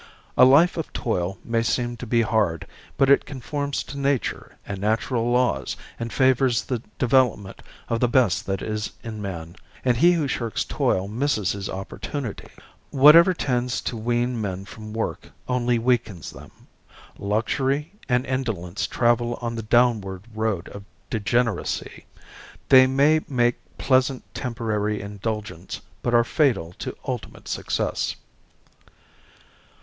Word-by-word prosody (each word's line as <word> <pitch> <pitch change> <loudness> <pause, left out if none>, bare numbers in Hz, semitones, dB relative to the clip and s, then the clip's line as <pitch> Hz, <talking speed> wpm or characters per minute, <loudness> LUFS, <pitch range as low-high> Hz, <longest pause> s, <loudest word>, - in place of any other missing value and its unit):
A 125 - +8
life 155 +8 +5
of 165 - -4
toil 95 -5 -2
may 115 -1 +1
seem 120 +1 -1
to 125 - -7
be 115 +1 +3
hard, 100 -7 0 0.3
but 135 - +4
it 140 - +5
conforms 140 +1 -3
to 140 - -8
nature 140 -2 -1
and 100 -1 -5
natural 115 +3 0
laws 120 - +1 0.2
and 115 0 -4
favors 130 -2 +3
the 125 -4 -3 0.2
development 125 -6 +1 0.3
of 115 - -1
the 125 - +3
best 120 - +2
that 95 -1 -2
is 110 0 -3
in 110 -3 -6
man; 85 -3 -6 0.3
and 125 -2 +3
he 175 +7 +6
who 160 -4 0
shirks 115 -5 -2
toil 95 +1 0
misses 110 - 0
his 100 -1 -4
opportunity. 110 +5 -5 0.4
Whatever 155 +6 +7
tends 125 -5 -1
to - - -3
wean 120 +1 -1
men 95 -2 -4
from 110 +1 -10
work 110 +1 -4 0.2
only 125 -1 +1
weakens 115 -7 -1
them. - - -12 0.7
Luxury 130 +8 0 0.2
and 125 +1 +2
indolence 110 -9 -2
travel 120 0 +1
on 115 -1 -3
the 115 - -4
downward 110 -5 +2
road 110 -5 -1
of 100 - -9 0.3
degeneracy. 115 +2 -1 0.6
They 130 -1 +8
may 145 +4 +3
make 120 -3 +1 0.2
pleasant 130 0 +2
temporary 105 -3 -2
indulgence, 100 -2 -5 0.2
but 120 -1 +1
are 120 - +6
fatal 115 - +1
to - - -5
ultimate - - -5
success. - - -1
120 Hz, 135 wpm, -24 LUFS, 105-130 Hz, 0.7 s, A